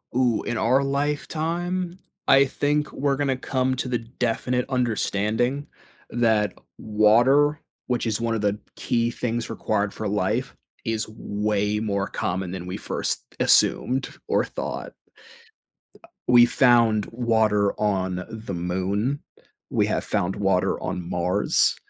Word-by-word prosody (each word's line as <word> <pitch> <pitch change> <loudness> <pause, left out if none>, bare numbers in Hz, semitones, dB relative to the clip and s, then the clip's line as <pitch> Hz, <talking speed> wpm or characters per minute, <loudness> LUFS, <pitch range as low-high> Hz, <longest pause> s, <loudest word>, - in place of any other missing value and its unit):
Ooh, 125 -3 +2
in 120 - -2
our 125 +5 +3
lifetime, 165 +6 -2 0.3
I 135 0 +7
think 145 +2 0
we're 140 0 0
gonna 135 -2 0
come 130 0 0
to 130 - -3
the 125 -1 0
definite 125 +1 -1
understanding 120 +1 0 0.4
that 110 -4 +2 0.2
water- 120 +8 +4 0.3
which 120 -2 0
is 110 -1 0
one 115 0 0
of 110 - -1
the 105 0 +1 0.2
key 115 0 0
things 120 -1 -2
required 100 -1 -1
for 110 - -4
life- 105 +5 -1 0.3
is 115 -1 -1
way 105 -1 -1
more 100 -2 -1
common 90 0 -3
than 90 -1 -6
we 90 - -4
first - - -2 0.2
assumed 130 +1 +3 0.2
or - - +2
thought. - - -5 1.3
We 120 -1 +8
found 115 -5 +4
water 110 -4 +1
on 95 -3 0
the 110 -3 -6
Moon, 95 +10 -1 0.5
we - - +2
have - - -1
found 90 +2 -1
water 95 -2 +1
on 90 -1 -4
Mars. 90 +4 +2
115 Hz, 130 wpm, -24 LUFS, 105-130 Hz, 1.3 s, We